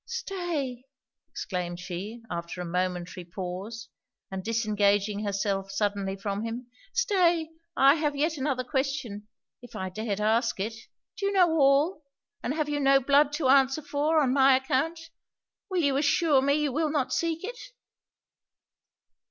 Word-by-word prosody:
'Stay!' 350 - -3 0.5
exclaimed 175 -2 -4
she, 195 +6 -6
after 170 +1 -5
a 180 - -3
momentary 180 +1 -2
pause, 190 +6 -6 0.4
and 190 -1 -4
disengaging 210 -2 +1
herself 195 -1 -1
suddenly 200 -1 -1
from 200 +1 -3
him 230 +2 -4 0.3
'Stay! 360 -9 +2 0.3
I 275 +1 +7
have 300 -2 -1
yet 310 +3 0
another 270 -3 -1
question, 265 -6 -3 0.3
if 245 - -13
I 190 0 -3
dared 210 +1 -3
ask 225 +1 +1
it! 215 +4 -2 0.5
Do 395 - 0
you - - +1
know 365 -4 +4
all? 295 +3 +3 0.4
and 270 - -2
have 305 -2 0
you 295 0 -1
no 275 -1 +5
blood 280 +2 +4
to 295 -3 0
answer 270 +2 +4
for, 295 +2 +1
on 255 -2 +1
my 270 -1 +6
account? 275 +5 0 0.7
Will 365 -3 0
you 280 -2 +2
assure 290 0 +3
me 280 +1 +2
you 300 -2 0
will 310 +3 0
not 290 -4 -1
seek 330 0 -1
it?' 480 +4 -6
265 Hz, 150 wpm, -27 LUFS, 205-300 Hz, 0.7 s, I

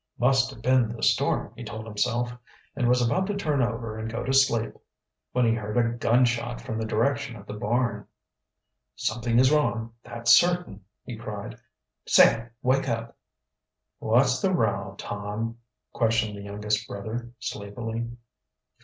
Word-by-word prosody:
"Must 130 +1 +3
have 135 -5 -11
been 130 -3 +3
the 115 0 -7
storm," - - +1
he - - -8
told 110 +1 -7
himself, 120 +3 -1 0.4
and 125 -4 +1
was 125 0 +3
about 185 +11 +1
to 205 - -2
turn 150 -8 0
over 115 -2 -2
and 110 +1 -4
go 120 +2 -3
to 135 - -1
sleep 120 -4 +3 0.6
when 125 -1 +2
he 115 - +3
heard 105 0 -3
a 115 -1 +2
gun 120 +1 +3
shot 120 0 -2
from 110 - -4
the 110 - -2
direction 135 +4 0
of 105 -2 -11
the 105 - -7
barn. 120 +4 -1 0.9
"Something 115 +1 -1
is 130 +2 +5
wrong, 115 -7 +1
that's 115 0 0
certain!" 175 - +3 0.2
he 120 - -7
cried. 105 -2 -7 0.5
"Sam, 115 +1 +5
wake 135 +1 +2
up!" 115 0 -3 0.8
"What's - - +3
the - - +2
row, - - 0
Tom?" 105 +3 -4 0.3
questioned 115 -2 +1
the 100 - -8
youngest 105 +2 -2
brother 110 +4 -5
sleepily. 115 +1 -5
115 Hz, 155 wpm, -26 LUFS, 110-125 Hz, 0.9 s, is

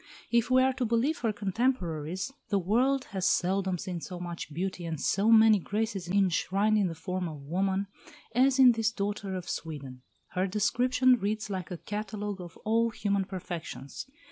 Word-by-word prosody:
If 235 0 +3
we 255 0 +5
are 265 0 +3
to 255 -1 -1
believe 235 +7 +1
her 230 -2 +1
contemporaries, 195 - -1 0.2
the 200 - +2
world 250 +9 +2
has 190 -1 +1
seldom 190 0 +1
seen 175 0 -5
so 180 +1 -7
much 170 -3 -6
beauty 180 +3 -3
and 165 -3 -4
so 200 +8 +2
many 220 -2 +7
graces 205 -1 -2
enshrined 200 +2 +2
in 200 - +2
the 165 - -5
form 180 +1 -3
of 150 -3 -9
woman 190 +6 0 0.5
as 260 +3 +4
in 260 -2 +8
this 225 -1 +1
daughter 200 -2 -3
of 180 -1 -5
Sweden. 140 -5 -6 0.3
Her 185 +1 0
description 245 +5 +3
reads 210 +1 -2
like 185 -4 -4
a 180 - -5
catalogue 210 0 -4
of 175 -2 -10
all 230 +2 +3
human 200 -3 -1
perfections. 175 - -6
200 Hz, 170 wpm, -29 LUFS, 180-225 Hz, 0.5 s, in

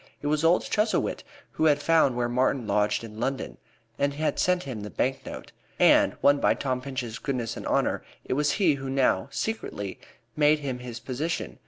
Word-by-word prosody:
It - - -10
was 150 +1 +1
old 165 +2 +4
Chuzzlewit 215 +1 0 0.3
who 160 - 0
had 145 -2 +4
found 155 -4 +3
where 120 -1 +1
Martin 125 0 +1
lodged 105 +1 +1
in 110 -1 -9
London, 135 +3 -3 0.4
and 140 0 +1
had 155 +1 -1
sent 180 0 +2
him 125 -6 -6
the 105 - -6
bank 135 +4 -1
note. - - -8 0.3
And, - - +5
won 145 0 +5
by - - +3
Tom 130 -2 -2
Pinch's 125 -4 -5
goodness 125 -5 -3
and - - -6
honor, - - +1 0.2
it - - -1
was 145 +1 +1
he 185 -7 +3
who 135 -1 -5
now, 130 -8 +2
secretly, 100 - -4 0.4
made 150 0 +4
him 135 -4 -4
this 125 -1 -7
position. 130 - -4
135 Hz, 190 wpm, -26 LUFS, 120-150 Hz, 0.4 s, And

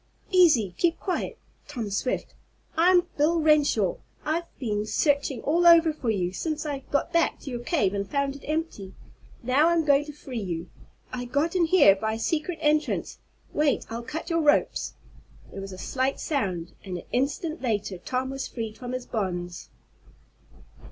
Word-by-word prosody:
"Easy 300 - +5
keep 340 -1 +2
quiet, 370 -3 -3 0.3
Tom 220 -4 -5
Swift! 230 +6 -2 0.4
I'm 355 +2 +5
Bill 320 +3 +3
Renshaw! 295 - +3 0.3
I've 335 +2 -1
been 210 -5 -2
searching 280 -2 +1
all 340 +4 +3
over 335 -2 +7
for 265 -6 -3
you, 185 -4 0
since 310 - -3
I 285 -2 -2
got 285 +4 0
back 335 0 +2
to 275 - -7
your 240 - -3
cave 240 - +1
and 200 -1 -3
found 280 -1 0
it 280 - -12
empty. 305 - -3 0.5
Now 265 +6 +4
I'm 335 -2 +2
going 285 0 +4
to 300 - -7
free 265 -5 -6
you. 175 -3 -4 0.4
I 245 -1 -3
got 285 +8 0
in 350 -2 +4
here 320 - +6
by 220 +2 -2
a 220 - -4
secret 325 +6 -1
entrance. 300 0 +1 0.3
Wait, 295 -3 +1
I'll 230 +1 -3
cut 320 +8 -5
your 330 0 +2
ropes." 295 -1 +2 0.6
There 195 - -7
was 195 0 -7
a 185 - -8
slight 260 +7 -1
sound, 185 - -2
and 185 -2 -5
an - - -8
instant 295 +6 -1
later 210 -6 -2
Tom 255 +6 -2
was 270 0 -4
freed 225 -3 -6
from 250 0 -5
his 255 -1 -4
bonds. 175 -5 -4
270 Hz, 170 wpm, -26 LUFS, 215-315 Hz, 0.6 s, over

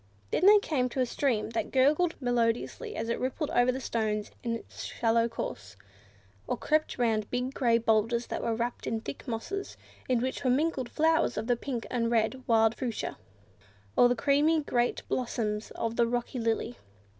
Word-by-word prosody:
Then 370 - +3
they 420 +1 +9
came 285 -11 0
to 260 - -5
a 255 - +3
stream 235 -4 0
that 230 - -2
gurgled 300 +6 +3
melodiously 245 - -1
as - - -3
it 235 - -1
rippled 265 +4 -2
over 250 +2 +2
stones 215 -4 -2
in 230 -1 -1
its 230 - -9
shallow 230 0 +1
course, 105 - -6 0.7
or - - -1
crept 310 0 0
round 220 -4 +1
big 250 +2 -2
grey 235 -4 +3
boulders 230 +1 +1
that - - -4
were 230 - 0
wrapped 240 +1 -3
in 225 - -1
thick 280 - -7
mosses, 310 - -4 0.3
in 250 -2 +3
which 260 +3 -3
were 255 - +2
mingled 265 -1 +1
flowers 320 +1 +2
of 215 - -2
the 245 +1 +2
pink 240 -1 -4
and 230 -2 0
red 235 +3 +1
wild 225 -1 +4
fuchsia, 240 -2 -4 0.8
or 245 - +6
the 245 - +2
creamy 290 +5 +3
great 240 -3 0
blossoms 220 -4 -2
of 230 0 -3
the 235 - +4
rock 240 +2 -2
lily. 230 -1 -1
240 Hz, 180 wpm, -29 LUFS, 230-265 Hz, 0.8 s, they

